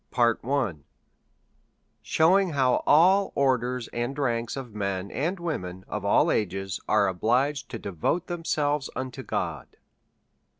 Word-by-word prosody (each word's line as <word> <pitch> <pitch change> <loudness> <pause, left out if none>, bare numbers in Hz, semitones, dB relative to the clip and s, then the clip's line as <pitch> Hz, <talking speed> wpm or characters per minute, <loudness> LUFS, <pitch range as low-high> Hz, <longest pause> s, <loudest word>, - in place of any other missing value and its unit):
Sheioing 180 +2 +3
how 130 -3 +2
all 190 +6 +5
Orders 125 -2 +1
and 120 +4 -3
Ranks 120 -3 -1
of 125 -5 -7
Men 100 -2 -3
and 175 +7 -2
Women 95 - -4
of 105 -2 -4
all 100 - +3
Ages 95 -1 -2
are 105 -1 +4
obliged 125 +10 0
to 115 - -5
devote 100 - -2
them 175 -1 -5
selves 145 -3 0
to 130 0 -5
God. 115 - -3
125 Hz, 120 wpm, -26 LUFS, 105-150 Hz, -, all